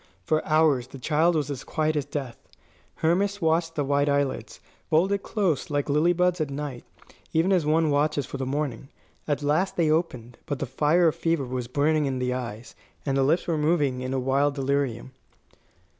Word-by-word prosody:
For 155 0 +1
hours 155 -5 +3
the 135 - -11
child 160 +6 +2
was 145 -2 -1
as 135 - -5
quiet 155 0 -1
as 145 -2 -1
death. 140 -4 -5 0.6
Hermas 195 +5 +2
watched 165 -1 +1
the 145 - 0
white 145 +1 +1
eyelids, 140 -1 -1 0.3
folded 190 +5 +2
close 190 - -1
like 145 -1 -1
lily 155 +4 +3
buds 180 0 +1
at 150 - -1
night, 140 -3 -5 0.5
even 165 +4 +2
as 170 -5 +2
one 155 0 +3
watches 145 -1 +1
for 140 - -6
the 135 - -3
morning. 135 -2 -3 0.4
At 145 -1 -1
last 160 +7 +1
they 160 -3 +2
opened; 125 -8 -2
but 145 - -2
the - - -3
fire 155 +6 +3
of - - -5
fever 165 -4 0
was 125 -1 -4
burning 145 +3 +1
in 130 -1 -2
the 125 0 -1
eyes, 120 -2 -6 0.3
and 135 -2 0
the 135 - +2
lips 155 +6 +2
were 165 -3 -1
moving 150 -5 +1
in 130 0 -4
a 135 - 0
wild 140 +2 +1
delirium. 135 -3 -1
145 Hz, 190 wpm, -26 LUFS, 135-160 Hz, 0.6 s, hours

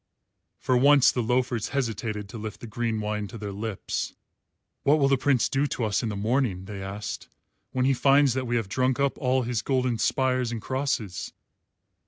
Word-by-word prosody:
For 130 - 0
once 140 +1 +6
the 125 - -1
loafers 125 -1 0
hesitated 110 -5 -2
to 115 - -7
lift 110 0 -6
the - - -8
green 115 0 -2
wine 105 0 -2
to 115 - -9
their 105 -2 -5
lips. 105 0 -4 0.7
"What 145 +2 +4
will 140 -2 +3
the 135 - +4
Prince 130 -2 +2
do 140 +2 +1
to 125 - -3
us 105 -2 +1
in 115 - -2
the 105 - -3
morning," 105 -3 0
they 100 -1 -7
asked, 100 +2 -5 0.4
"when 130 0 0
he 135 - +4
finds 135 +1 +4
that 130 -1 -2
we 120 - 0
have 115 -4 0
drunk 130 +5 0
up 140 0 +1
all 130 0 +2
his 120 -3 -1
golden 125 -1 0
spires 130 -1 +1
and 115 - -3
crosses?" 125 -6 -2
120 Hz, 195 wpm, -26 LUFS, 105-130 Hz, 0.7 s, once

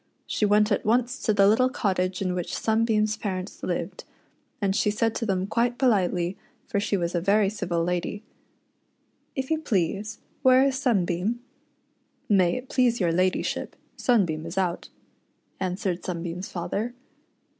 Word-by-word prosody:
She 210 - 0
went 210 +1 +4
at 205 - +1
once 245 +4 +1
to 220 - +2
the 200 -1 +5
little 250 +5 +4
cottage 185 -5 -1
in 185 -1 0
which 180 -1 -3
Sunbeam's 220 -1 +1
parents 185 -2 -4
lived, - - -3 0.6
and 195 -2 0
she 210 - +2
said 225 +2 +1
to 230 - -3
them 190 -2 0
quite 240 +4 0
politely, 185 -7 +1 0.3
for 200 - -1
she 200 0 0
was 170 -1 -2
a 175 - 0
very 200 +2 +3
civil 175 -5 -1
lady 180 +4 -2 0.3
— - - -45
" - - -44
If 265 +1 -3
you 315 - +2
please, 205 - -1 0.2
where 260 -1 +6
is 265 -1 0
Sunbeam 205 -2 0 0.4
.'" - - -44
"May 185 -4 +4
it 255 +1 -7
please 245 -3 +2
your 175 -4 +2
ladyship, 185 +2 0 0.2
Sunbeam 170 -10 +1
is 170 +3 -7
out," 180 -3 -1 0.7
answered 185 -1 -2
Sunbeam's 175 +1 -4
father. 200 +7 -3
200 Hz, 160 wpm, -26 LUFS, 180-230 Hz, 0.7 s, where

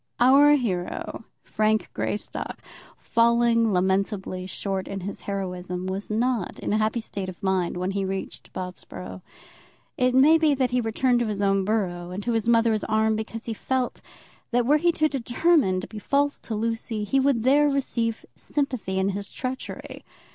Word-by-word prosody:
Our 280 +4 +7
hero, 210 -3 -3 0.2
Frank 215 0 0
Greystock, 210 - -3 0.4
falling 230 -1 +3
lamentably 190 0 0
short 190 0 -3
in 195 -1 -5
his 195 +2 -5
heroism, 180 -2 -4
was 190 +2 -4
not 230 -1 0
in - - -2
a 215 - +2
happy 215 +2 +1
state 200 -4 -4
of 185 - -11
mind 190 -2 0
when 180 +2 -1
he 195 0 -1
reached 190 0 -5
Bobsborough. 95 - -7 0.8
It 250 0 +3
may 305 +5 +6
be 305 -3 +3
that 260 -2 0
he 250 0 +2
returned 240 +2 +1
to 240 - 0
his 205 -1 -2
own 195 -1 +2
borough 180 -5 -1
and 185 +3 -5
to 240 - 0
his 225 0 0
mother's 230 -2 +3
arms 220 0 +2
because 225 +1 -5
he 230 - -3
felt, 255 +3 -2 0.5
that 245 -1 +1
were 295 +4 +5
he 345 +3 +3
to 310 -1 +2
determine 270 - +2
to - - -7
be 215 - -8
false 285 +5 +1
to 225 - -5
Lucy, 225 0 -2
he 270 +7 +1
would 265 -4 +2
there 290 +3 +5
receive 235 -5 -1
sympathy 255 -10 -2
in 190 +1 +2
his 200 0 -4
treachery. 255 0 -6
220 Hz, 170 wpm, -25 LUFS, 195-250 Hz, 0.8 s, Our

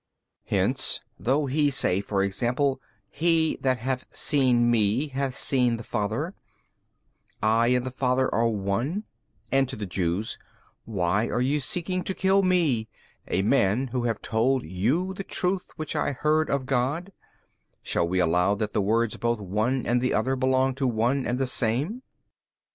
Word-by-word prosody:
B. - - 0
Hence - - 0 0.2
though 135 - +1
He 145 +2 +2
say 115 -9 +1
for 100 -1 0
example, 125 +7 0 0.3
He 165 -1 +1
that 130 -1 +1
hath 130 +1 -3
seen 125 -5 +2
Me 115 +6 +2
hath 135 -1 -2
seen 125 -3 +1
the 115 - -8
Father, 110 - -2 1.1
I 115 +2 +3
and 125 0 +2
the 130 - -4
Father 130 0 +1
are 115 +1 +2
One, 115 - -1 0.5
and 135 -1 +3
to - - -5
the 105 - -5
Jews, 90 +3 -2 0.5
Why 100 0 0
are - - -1
ye 135 +4 +1
seeking 180 +6 -2
to 190 - -2
kill 195 +1 +3
Me, 160 -12 +1 0.4
a 95 - 0
man 115 +2 +2
Who 120 0 -2
have 115 -3 -2
told 125 +4 +1
you 125 - 0
the 195 - -6
truth 185 0 -1
which 155 -1 -5
I 140 - 0
heard 155 +3 +1
of 140 -2 0
God, 140 +8 -1 0.7
shall 85 - 0
we 90 +2 -1
allow 90 +3 +2
that 105 +1 -3
the 105 - +1
words 110 +3 +1
both 120 -1 0
one 110 +7 -1
and 120 +1 +1
other 130 +5 +1
belong 130 0 +2
to 135 - +3
One 125 +4 0
and 120 - 0
the 135 - 0
Same? 130 - 0
125 Hz, 165 wpm, -26 LUFS, 110-140 Hz, 1.1 s, I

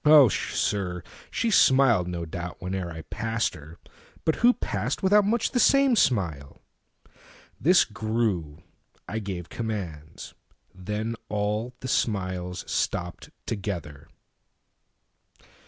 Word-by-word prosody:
Oh 150 -5 +8
sir, 90 -3 -1 0.3
she 230 -2 0
smiled, 130 - +5
no 85 -1 -4
doubt, 85 +2 -6
Whene'er 90 -1 -4
I 80 -1 -8
passed 115 +6 -2
her; 75 +3 -12 0.5
but 160 - +2
who 240 +1 +5
passed - - -3
withoutMuch 205 +4 +3
the 250 - +1
same 275 -1 +5
smile? 85 - 0 1.0
This 175 +5 +5
grew; 105 -8 -2 0.4
I 110 +5 -3
gave 95 -5 -6
commands; 90 -10 -6 0.4
Then 105 +5 -3
all 105 +4 -2
smiles 95 -7 -1
stopped 90 0 -2 0.2
together. 90 -9 -5
105 Hz, 105 wpm, -26 LUFS, 90-120 Hz, 1.0 s, Oh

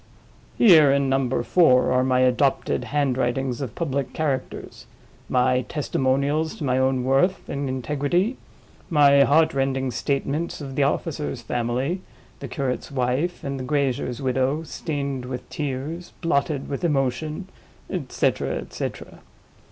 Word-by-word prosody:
Here, 160 - +7
in 140 -1 +2
Number 135 -1 +1
Four, 130 -9 +4
are 125 0 +3
my 130 -1 +2
Adopted 130 +2 +1
Handwritings 135 -2 0
of 125 -6 -5
public 140 -4 -2
characters; 140 -5 -3 0.4
my 125 0 +3
testimonials 140 +2 0
to - - -7
my 130 -2 +1
own 130 -1 +1
worth 135 +9 +1
and 140 -1 -3
integrity; 150 - 0 0.5
my 145 -4 +6
Heartrending 135 -4 +2
Statements 140 +5 -2
of 140 -3 -7
the 145 - 0
officer's 140 -2 -1
family, 125 +9 -1 0.4
the 140 - -6
curate's 130 0 -3
wife, 135 +6 -1
and 140 -1 -3
the - - -4
grazier's 130 -2 -1
widow, 130 +4 0
stained 140 -5 -4
with 125 -1 -6
tears, 150 +4 -4
blotted 145 -4 0
with 140 - -4
emotion; 155 +4 -1 0.4
et - - -5
cetera, - - 0
et - - -7
cetera. - - -6
135 Hz, 130 wpm, -24 LUFS, 130-150 Hz, 0.5 s, Here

